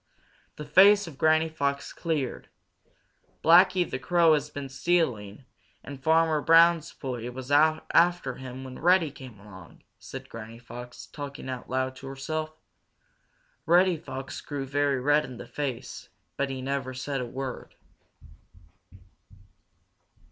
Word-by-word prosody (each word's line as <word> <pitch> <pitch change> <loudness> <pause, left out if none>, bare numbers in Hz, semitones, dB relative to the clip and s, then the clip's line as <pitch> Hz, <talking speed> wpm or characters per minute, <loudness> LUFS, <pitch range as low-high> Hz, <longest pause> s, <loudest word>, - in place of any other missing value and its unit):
The 150 - -8
face 200 +7 +6
of 155 -5 -11
Granny 160 0 +3
Fox 140 -3 -3
cleared. 155 -7 -3 0.9
"Blacky 180 +1 +5
the 130 - -4
Crow 170 +1 +4
has 150 -1 0
been 145 -2 -6
stealing, 135 - -1 0.4
and 140 -2 -9
Farmer 160 +1 +3
Brown's 165 0 +5
boy 125 -3 -6
was 130 +2 -8
out 155 +2 +3
after 175 -6 +3
him 130 0 -8
when 130 -1 -9
Reddy 175 -2 +3
came 130 -6 -12
along," 100 -2 -14 0.2
said - - -9
Granny 115 0 -9
Fox, 120 +1 -10
talking 140 -2 -8
out 130 -1 -6
loud 130 0 -1
to 135 - -10
herself. 155 +4 -4 1.2
Reddy 180 +2 +5
Fox 135 -3 -7
grew 140 -2 -5
very 140 0 0
red 145 +3 +3
in 130 -4 -9
the - - -9
face, 135 -5 -6 0.3
but 140 0 -1
he 130 -1 -5
never 135 -1 -3
said 135 +1 -3
a - - -3
word. 130 +1 -7
140 Hz, 135 wpm, -27 LUFS, 130-160 Hz, 1.2 s, face